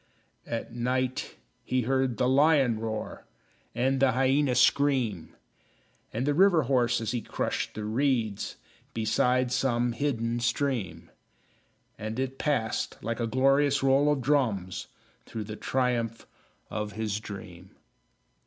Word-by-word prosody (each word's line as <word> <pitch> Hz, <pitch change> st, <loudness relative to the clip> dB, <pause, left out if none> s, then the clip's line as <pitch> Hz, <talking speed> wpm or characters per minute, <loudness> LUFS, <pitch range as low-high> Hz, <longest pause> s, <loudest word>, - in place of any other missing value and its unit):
At 115 Hz, 0 st, -4 dB
night 125 Hz, +1 st, -1 dB, 0.3 s
he 130 Hz, -1 st, 0 dB
heard 130 Hz, -1 st, 0 dB
the 125 Hz, -, +2 dB
lion 135 Hz, -4 st, +4 dB
roar, 110 Hz, -1 st, -5 dB, 0.5 s
And 135 Hz, +2 st, +1 dB
the 135 Hz, -2 st, +4 dB
hyena 135 Hz, +1 st, +2 dB
scream, 130 Hz, -, +2 dB, 0.8 s
And 120 Hz, +4 st, -2 dB
the 145 Hz, -, +2 dB
river 175 Hz, -1 st, +5 dB
horse, 125 Hz, -2 st, +2 dB
as 115 Hz, -, -2 dB
he 120 Hz, -2 st, -2 dB
crushed -, -, -3 dB
the 105 Hz, -, -4 dB
reeds 115 Hz, -3 st, 0 dB, 0.4 s
Beside 125 Hz, +3 st, +1 dB
some 120 Hz, -1 st, +1 dB
hidden 120 Hz, -3 st, -1 dB
stream; 120 Hz, -4 st, -2 dB, 0.9 s
And 110 Hz, +2 st, -4 dB
it 135 Hz, 0 st, -3 dB
passed, 140 Hz, -8 st, -1 dB
like 115 Hz, +3 st, -3 dB
a 115 Hz, -, 0 dB
glorious 135 Hz, +3 st, +3 dB
roll 135 Hz, +2 st, +4 dB
of 145 Hz, -3 st, 0 dB
drums, 115 Hz, -10 st, 0 dB, 0.4 s
Through 110 Hz, -, -5 dB
the 105 Hz, +1 st, -7 dB
triumph 120 Hz, -2 st, -1 dB, 0.5 s
of 105 Hz, -1 st, -3 dB
his 105 Hz, -1 st, -2 dB
dream. 95 Hz, -4 st, -10 dB
125 Hz, 125 wpm, -28 LUFS, 110-135 Hz, 0.9 s, river